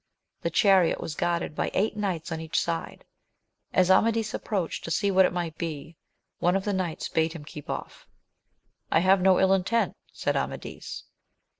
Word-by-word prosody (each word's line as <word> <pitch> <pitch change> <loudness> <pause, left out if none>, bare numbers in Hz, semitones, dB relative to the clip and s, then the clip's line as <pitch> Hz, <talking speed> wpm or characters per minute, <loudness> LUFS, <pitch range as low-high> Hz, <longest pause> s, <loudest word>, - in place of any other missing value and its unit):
The 170 - -1
chariot 190 0 +4
was 155 - -4
guarded 170 0 -1
by - - -1
eight 210 +2 +1
knights 185 -6 -3
on 160 0 -3
each 160 -1 0
side. 165 -1 -4 0.7
As 185 0 +4
Amadis 225 +2 +3
approached 190 -6 -2
to - - -5
see 200 +5 +1
what 190 -1 +6
it - - -5
might 175 -3 -3
be, 160 -1 -5 0.4
one 175 +2 +2
of 195 - -1
the 205 - 0
knights 185 -4 -2
bade 160 0 0
him 155 -4 -9
keep 150 -1 -10
off. - - -6 0.8
I 160 - +4
have 190 +1 +4
no 185 0 +5
ill 190 0 +4
intent, 210 +5 +1 0.2
said - - -1
Amadis. - - -4
180 Hz, 175 wpm, -27 LUFS, 165-195 Hz, 0.8 s, what